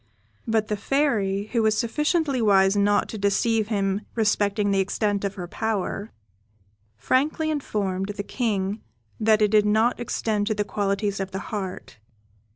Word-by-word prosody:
But 220 Hz, -1 st, +1 dB
the 210 Hz, -, -1 dB
Fairy, 205 Hz, -6 st, 0 dB
who 235 Hz, -, +3 dB
was 215 Hz, -1 st, +2 dB
sufficiently 300 Hz, +3 st, 0 dB
wise 195 Hz, -2 st, +4 dB
not 205 Hz, 0 st, +2 dB
to 220 Hz, -, -6 dB
deceive 210 Hz, +2 st, +1 dB
him 200 Hz, -2 st, 0 dB
respecting 210 Hz, -2 st, +1 dB
the 195 Hz, -, +2 dB
extent 200 Hz, +1 st, 0 dB
of 200 Hz, 0 st, -2 dB
her 180 Hz, -3 st, -6 dB
power, 215 Hz, +1 st, -3 dB, 0.9 s
frankly 305 Hz, -, +1 dB
informed 200 Hz, -9 st, -2 dB
the 205 Hz, 0 st, -4 dB
King 205 Hz, -3 st, -2 dB, 0.4 s
that 215 Hz, -1 st, +3 dB
it 210 Hz, -, +2 dB
did 210 Hz, -1 st, +4 dB
not 220 Hz, +4 st, +2 dB
extend 215 Hz, -3 st, -1 dB
to 215 Hz, -, 0 dB
the 210 Hz, -, 0 dB
qualities 200 Hz, 0 st, -1 dB
of 195 Hz, -1 st, -3 dB
the 190 Hz, -, -5 dB, 0.2 s
heart. 190 Hz, -, -5 dB
210 Hz, 155 wpm, -24 LUFS, 200-225 Hz, 0.9 s, wise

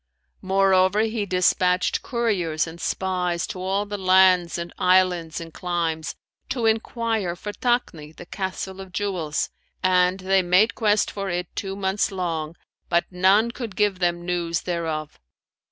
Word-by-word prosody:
Moreover, 190 Hz, +1 st, +3 dB
he 220 Hz, -2 st, -1 dB
despatched 180 Hz, 0 st, +2 dB
couriers 190 Hz, -10 st, 0 dB
and 165 Hz, 0 st, -10 dB
spies 180 Hz, -2 st, -1 dB
to 185 Hz, -, -7 dB
all 195 Hz, +2 st, 0 dB
the 205 Hz, 0 st, -5 dB
lands 185 Hz, -2 st, +4 dB
and 170 Hz, 0 st, -6 dB
islands 180 Hz, -3 st, +2 dB
and 165 Hz, -1 st, -9 dB
climes, 165 Hz, -3 st, -2 dB, 0.3 s
to 240 Hz, -4 st, -1 dB
enquire 225 Hz, -4 st, 0 dB
for 210 Hz, +4 st, -6 dB
Takni, 220 Hz, -13 st, -1 dB
the 170 Hz, -, -12 dB
Castle 190 Hz, +1 st, -5 dB
of 190 Hz, -1 st, -11 dB
Jewels, 180 Hz, -6 st, -2 dB, 0.3 s
and 185 Hz, 0 st, +3 dB
they 190 Hz, 0 st, +3 dB
made 185 Hz, +5 st, +3 dB
quest 210 Hz, -2 st, +1 dB
for 195 Hz, -1 st, -4 dB
it 175 Hz, -1 st, -4 dB
two 195 Hz, -1 st, -4 dB
months 195 Hz, +1 st, 0 dB
long, 165 Hz, -4 st, -3 dB, 0.3 s
but 170 Hz, 0 st, +2 dB
none 195 Hz, +6 st, +3 dB
could 235 Hz, -5 st, -7 dB
give 205 Hz, -2 st, +1 dB
them 175 Hz, -1 st, 0 dB
news 170 Hz, -1 st, -1 dB
thereof. 160 Hz, -3 st, -3 dB
185 Hz, 145 wpm, -24 LUFS, 175-200 Hz, 0.3 s, lands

